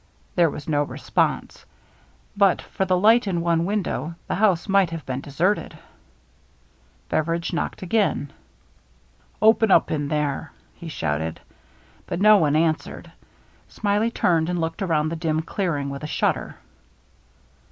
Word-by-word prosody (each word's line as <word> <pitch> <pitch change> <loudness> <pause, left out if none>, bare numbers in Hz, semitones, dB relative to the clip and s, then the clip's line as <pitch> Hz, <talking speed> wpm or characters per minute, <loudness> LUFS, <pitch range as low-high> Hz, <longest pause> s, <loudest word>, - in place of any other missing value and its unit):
There 170 -2 +3
was 145 - -8
no 145 -2 +1
response. 145 - -2 0.7
But 200 -2 +4
for 190 - -3
the 185 0 +2
light 220 +4 +4
in 175 -3 0
one 170 0 +1
window, 190 -4 -2
the - - -3
house 195 -3 +2
might 195 -3 +3
have 165 -3 -7
been 130 0 -4
deserted. 170 +9 -1 1.3
Bev 155 - 0
eridge 170 +1 -2
knocked 170 - -3
again. 185 -7 0 0.5
" - - -35
Open 220 0 +5
up - - +4
in 145 -2 -1
there! 150 +1 -2
" - - -35
he 170 - -7
shouted. 80 - -3 0.7
But - - -3
no 215 +1 +7
one 150 -5 +2
answered. 160 0 -1 0.6
Smiley 210 +2 0
turned 170 -7 +1
and 175 -1 -1
looked 165 +2 -3
around 155 -5 +1
the 165 - -3
dim 160 -1 -1
clearing 155 -6 -2
with 140 - -6
a - - -3
shudder. - - -1
165 Hz, 150 wpm, -23 LUFS, 150-195 Hz, 1.3 s, no